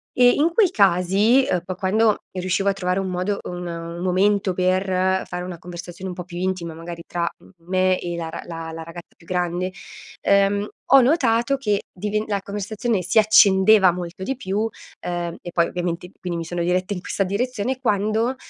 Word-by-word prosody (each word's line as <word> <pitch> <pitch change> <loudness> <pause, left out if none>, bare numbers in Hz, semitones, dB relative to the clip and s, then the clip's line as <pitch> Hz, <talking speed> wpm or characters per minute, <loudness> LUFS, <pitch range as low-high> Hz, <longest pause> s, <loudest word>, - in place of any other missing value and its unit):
e 245 -1 +6
in 295 +7 +2
quei 395 0 +4
casi, 200 - +4
uhm, 180 - +1
po 185 - -3
quando 205 +4 +2 0.2
riuscivo 185 +2 0
a - - +2
trovare 185 -1 -1
un 190 -1 -2
modo 185 +3 -1
un 180 0 -5
un 170 0 -6
momento 190 +1 +2
per 185 +1 +1 0.4
fare 180 - -5
una 180 -1 -6
conversazione 175 +2 -8
un - - -8
po' 180 - -5
più 175 0 -9
intima, 180 -3 -2
magari 170 +1 -8
tra 170 -1 -1 0.4
me 185 0 +2
e 175 -1 -4
la 165 -1 -4
r 165 - -7
la 165 -1 -6
ragazza 170 +1 -11
più 165 - -20
grande, 180 +1 -1 0.5
uhm, 200 +1 +3 0.3
ho 275 - +9
notato 250 -2 +2
che 210 -7 0
diven 210 +3 -2
la 200 -2 -1
conversazione 205 +2 -2
si 180 - -1
accendeva 205 -2 +6
molto 175 +1 -7
di 265 +8 -2
più, 200 -5 -3
uhm, 225 +1 0 0.7
e - - -7
poi 170 0 +3
ovviamente 175 0 -4
quindi 175 -2 -4
mi 165 - -4
sono 175 +1 -3
diretta 185 +3 0
in 185 - -4
questa 195 - -1
direzione, 245 +5 -2
quando, 220 +1 +1
185 Hz, 185 wpm, -22 LUFS, 175-210 Hz, 0.7 s, ho